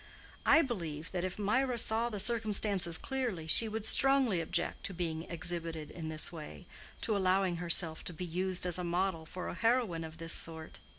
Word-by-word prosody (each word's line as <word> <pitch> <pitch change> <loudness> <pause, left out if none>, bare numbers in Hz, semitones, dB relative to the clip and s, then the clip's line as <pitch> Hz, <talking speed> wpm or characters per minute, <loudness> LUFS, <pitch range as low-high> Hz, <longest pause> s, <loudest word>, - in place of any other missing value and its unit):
I 315 +3 +7
believe 165 - -4
that 180 -2 -2
if 185 0 -3
Mirah 245 +5 +1
saw 230 +1 +3
the 210 -3 -5
circumstances 210 -5 +1
clearly, 245 - -3
she 220 +8 +4
would 220 0 -3
strongly 265 -7 +3
object 170 +1 -1
to 195 - -2
being 165 -2 -3
exhibited 165 -2 -4
in 165 -2 -6
this 155 +1 +3
way—to 155 - -5
allowing 190 -2 +2
herself 170 -1 +1
to - - -4
be 180 +3 -5
used 180 +2 0
as 180 0 0
a - - -2
model 175 -2 -1
for 180 +1 -6
a - - -4
heroine 210 -3 +1
of 160 0 -9
this 165 0 -2
sort." 160 -1 -2
180 Hz, 180 wpm, -33 LUFS, 165-215 Hz, -, I